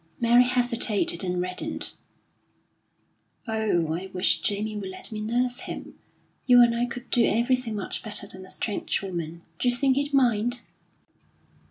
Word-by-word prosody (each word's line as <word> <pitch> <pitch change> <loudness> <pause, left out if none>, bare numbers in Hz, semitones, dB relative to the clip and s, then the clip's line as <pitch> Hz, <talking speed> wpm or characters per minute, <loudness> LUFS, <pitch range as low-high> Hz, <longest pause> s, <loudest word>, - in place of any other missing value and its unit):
Mary 240 +1 +5
hesitated 240 -7 +3
and 180 -1 -2
reddened: 180 0 -4 1.5
"Oh, 210 -8 0
I 185 +3 -5
wish 185 +1 +3
Jamie 210 +1 -2
would 200 -2 -5
let 185 - -2
me 215 -1 -5
nurse 245 +3 -1
him! - - -7 0.5
You 245 -1 +7
and 235 -1 +3
I 240 +1 0
could 245 +1 -9
do 240 - +4
everything 235 0 +1
much 205 - -3
better 210 -1 -4
than 190 -1 -9
a 185 - -14
strange 205 -2 -3
woman. 170 -3 -6 0.2
D'you 250 - +2
think 265 +1 +1
he'd 285 +1 -1
mind?" 245 -3 +1
220 Hz, 150 wpm, -25 LUFS, 190-245 Hz, 1.5 s, You